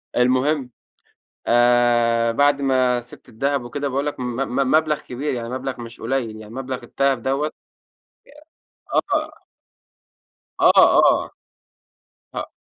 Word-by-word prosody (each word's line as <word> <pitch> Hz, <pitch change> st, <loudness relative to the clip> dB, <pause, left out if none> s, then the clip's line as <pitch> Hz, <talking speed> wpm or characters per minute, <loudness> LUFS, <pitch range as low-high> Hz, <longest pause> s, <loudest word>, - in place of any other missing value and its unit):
المهم، 130 Hz, +2 st, +1 dB, 0.8 s
آآ، 120 Hz, -1 st, +3 dB
بعد 145 Hz, +3 st, +2 dB
ما 130 Hz, -2 st, +2 dB
سبت 120 Hz, -, -14 dB
الدهب 140 Hz, +4 st, -1 dB
وكده 140 Hz, +4 st, -4 dB
باقول 140 Hz, +2 st, -2 dB
لك 145 Hz, -, -4 dB
م -, -, -3 dB
م 135 Hz, 0 st, -1 dB
مبلغ 155 Hz, -1 st, +2 dB
كبير 135 Hz, +3 st, -4 dB
يعني 115 Hz, -1 st, -5 dB
مبلغ 130 Hz, 0 st, -5 dB
مش 115 Hz, -1 st, -10 dB
قليل 115 Hz, -2 st, -2 dB
يعني 110 Hz, +1 st, -11 dB
مبلغ 130 Hz, -1 st, -5 dB
الدهب 135 Hz, +1 st, 0 dB
دوّة 140 Hz, +4 st, -1 dB, 1.4 s
آه. -, -, -1 dB, 1.2 s
آه، -, -, +6 dB
آه، -, -, +5 dB, 1.0 s
آه. -, -, -4 dB
130 Hz, 120 wpm, -21 LUFS, 120-140 Hz, 1.4 s, آه